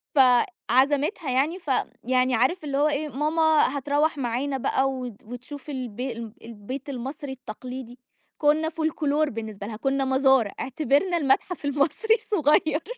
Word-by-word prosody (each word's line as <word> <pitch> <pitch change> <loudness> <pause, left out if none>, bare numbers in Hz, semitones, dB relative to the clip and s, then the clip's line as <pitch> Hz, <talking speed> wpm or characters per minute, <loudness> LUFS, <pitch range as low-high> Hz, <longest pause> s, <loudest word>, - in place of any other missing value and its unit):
فعزمِتها 270 - +3
يعني، 290 +8 +1
فيعني 255 -4 0
عارف 275 +9 +1
اللي 280 -2 -2
هو 295 - +4
إيه، 300 0 -1
ماما 305 0 +2
هتروّح 290 +3 +1
معانا 270 +2 -1
بقى 265 +1 +1
وت 250 -5 -7
وتشوف 250 +6 -9
البي 255 -1 -4
ال 230 -2 -7
البيت 230 +5 -7
المصري 270 +2 -5
التقليدي، 250 0 -8 0.4
كُنّا 310 +2 +2
فولكلور 310 -2 0
بالنسبة 215 -3 -6
لها، 220 - -6
كُنّا 270 +1 0
مزار، 265 -4 +3
اعتبرنا 300 +6 +1
المتحف 295 +3 0
المصري 295 +10 +2
الصُغير. 315 - +1
275 Hz, 130 wpm, -25 LUFS, 250-300 Hz, 0.4 s, هو